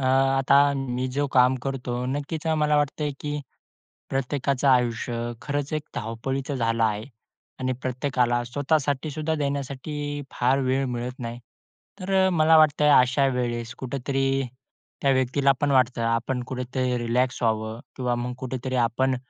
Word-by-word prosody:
अ, - - -4
आता 135 +1 +4
मी 130 -1 -2
जो 145 0 +2
काम 125 +1 +5
करतो 125 -2 -3
नक्कीच 145 +4 -3
अ, 160 - +2
मला 150 -1 +2
वाटतंय 145 0 0
की 150 0 -3 0.7
प्रत्येकाचं 135 0 0
आयुष्य 120 -2 +2 0.3
खरंच 145 +1 -3
एक 155 - -1
धावपळीचं 130 +5 -3
झालं 115 -1 0
आहे 105 0 0 0.6
आणि 130 0 0
प्रत्येकाला 125 -2 0
स्वतःसाठी 145 +2 0
सुद्धा 155 +2 -2
देण्यासाठी 145 +1 -3
फार 130 +2 +2
वेळ 135 +1 +1
मिळत 125 +1 -4
नाही. 120 0 -5 0.6
तर 190 0 +2
मला 160 -1 +5
वाटतंय 150 -1 +4
अशा 130 +2 +2
वेळेस 120 0 -2
कुठेतरी 135 +1 -1 0.6
त्या 140 - +4
व्यक्तीला 135 +2 +3
पण 145 -1 +1
वाटतं 130 -2 +3
आपण 115 +2 0
कुठेतरी 125 -1 -2
रिलॅक्स 120 +1 0
व्हावं 110 0 -1 0.2
किंवा 125 -2 0
मग 125 +1 -3
कुठेतरी 130 0 -4
आपण 125 +2 +1
130 Hz, 140 wpm, -25 LUFS, 125-145 Hz, 0.7 s, काम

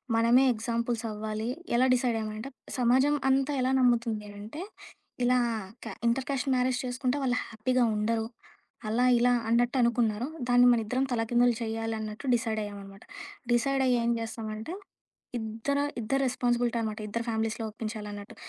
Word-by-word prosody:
మనమే 235 +3 +5
ఎగ్జాంపుల్స్ 235 +1 -2
అవ్వాలి. 215 +1 -4 0.3
ఎలా 255 +2 +4
డిసైడయ్యామంటే 225 -1 -1 0.3
సమాజం 260 +4 +4
అంతా 270 +2 +2
ఎలా 260 +1 +1
నమ్ముతుంది 235 -4 +2
అనంటే 210 +10 -8 0.6
ఇలా 250 +1 +4 0.5
క - - -5
ఇంటర్‌క్యాస్ట్ 265 +2 0
మ్యారేజ్ 250 0 +1
చేసుకుంటే, 255 +2 -1
వాళ్ళు 250 -1 +1
హ్యాపీగా 245 +3 0
ఉండరు. 220 +1 0 0.6
అలా 240 +3 +2
ఇలా 245 +1 +4 0.2
అన్నట్టు 240 +3 +2
అనుకున్నారు. 235 -1 +1 0.2
దాన్ని 245 0 +6
మనిద్దరం 240 +4 0
తలకిందులు 240 +1 +2
చేయాలన్నట్టు 225 0 -4
డిసైడయ్యామనమాట. 205 -4 -4 0.5
డిసైడయ్యి 260 +1 +2
ఏం 235 - +2
జేస్తామంటే 220 +5 -5 0.7
ఇద్దరు, 225 +6 -1 0.2
ఇద్దరు 270 +5 0
రెస్పాన్సిబిలిటీ 240 -1 0
అనమాట. 215 0 -3
ఇద్దరు 230 +2 -3
ఫ్యామిలీస్‌లో 225 0 -1
ఒప్పించాలన్నట్టు. 210 -2 -6
235 Hz, 120 wpm, -28 LUFS, 220-250 Hz, 0.7 s, దాన్ని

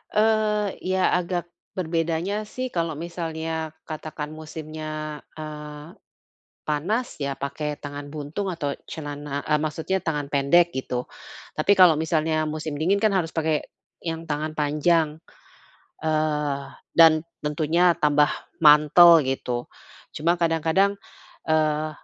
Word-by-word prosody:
Eee, 210 -1 +2
ya 185 0 +1
agak 175 -1 -3 0.2
berbedanya 170 +4 -1
sih 255 +3 -5
kalau 165 -2 -1
misalnya 160 -1 -4
katakan 155 -1 -6
musimnya, 155 -1 -6 0.2
eee, 150 0 -8 0.7
panas 180 +12 -1
ya 140 -1 -2
pakai 145 +2 -4
tangan 145 0 -7
buntung 155 +7 -4
atau 155 -6 -2 0.2
celana, 145 -2 -5
e - - -2
maksudnya 160 +5 -1
tangan 150 -4 -3
pendek 170 +5 +4
gitu. 125 -1 -3 0.5
Tapi 155 +6 +3
kalau 180 -3 +8
misalnya 155 -1 0
musim 155 -1 -4
dingin 185 +5 +3
kan 215 -2 +4
harus 170 -4 -1
pakai 160 -2 0 0.3
yang 165 -1 -4
tangan 155 0 -3
panjang, 155 +1 +1 0.8
eee, 150 -3 0 0.3
dan 160 -2 +7 0.2
tentunya 160 +4 +2
tambah 150 0 +4 0.3
mantel, 160 +2 +7
gitu. 125 -2 -3 0.4
Cuma 165 +3 +1
kadang-kadang, 165 +4 +2 0.5
eee, 155 -1 +1
155 Hz, 115 wpm, -24 LUFS, 150-170 Hz, 0.8 s, kalau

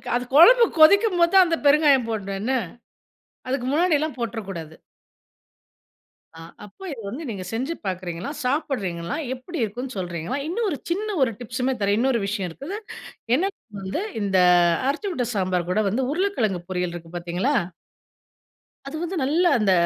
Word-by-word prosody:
அது 245 - 0
குழம்பு 470 +10 +8
கொதிக்கும்போதுதான் 370 +1 +6
அந்த 335 -1 0
பெருங்காயம் 285 -4 +5
போடணும் 200 -3 -3
என்ன. 235 +5 -1 1.0
அதுக்கு 255 -1 -2
முன்னாடியெல்லாம் 310 -1 +1
போட்றக்கூடாது. 195 -9 -5 1.6
அ. 165 - -13 0.3
அப்போ 210 - -15
இது 260 -5 -7
வந்து 265 +10 -6
நீங்க 195 -4 -5
செஞ்சு 260 +8 -2
பார்க்கிறீங்களா, 180 +1 -4
சாப்பிடுறீங்களா, 225 - -2 0.2
எப்படி 265 +7 -8
இருக்குன்னு 245 +4 -5
சொல்றீங்களா? 175 - -3
இன்னும் 430 +7 -1
ஒரு 290 - -2
சின்ன 400 +5 -1 0.2
ஒரு 240 - +1
டிப்ஸ்மே 250 +2 -2
தர்றேன். 200 +1 +2
இன்னொரு 255 -1 +2
விஷயம் 195 -3 -2
இருக்குது. 280 - -7 0.6
என்ன 380 +8 0 0.3
வந்து 190 - -3 0.2
இந்த 195 -2 +2 0.5
அரைச்சு 325 +9 -1
விட்ட 255 -8 -1
சாம்பார் 185 -3 -1
கூட 210 - +1
வந்து 240 +7 -1
உருளைக்கிழங்கு 290 - 0
பொரியல் 180 -2 -2
இருக்கு 165 -1 -10
பார்த்தீங்களா? 175 +11 -1 1.3
அது 275 - -6
வந்து 345 +2 -4
நல்லா 320 +7 +2
அந்த 210 -3 +2
250 Hz, 140 wpm, -23 LUFS, 190-315 Hz, 1.6 s, குழம்பு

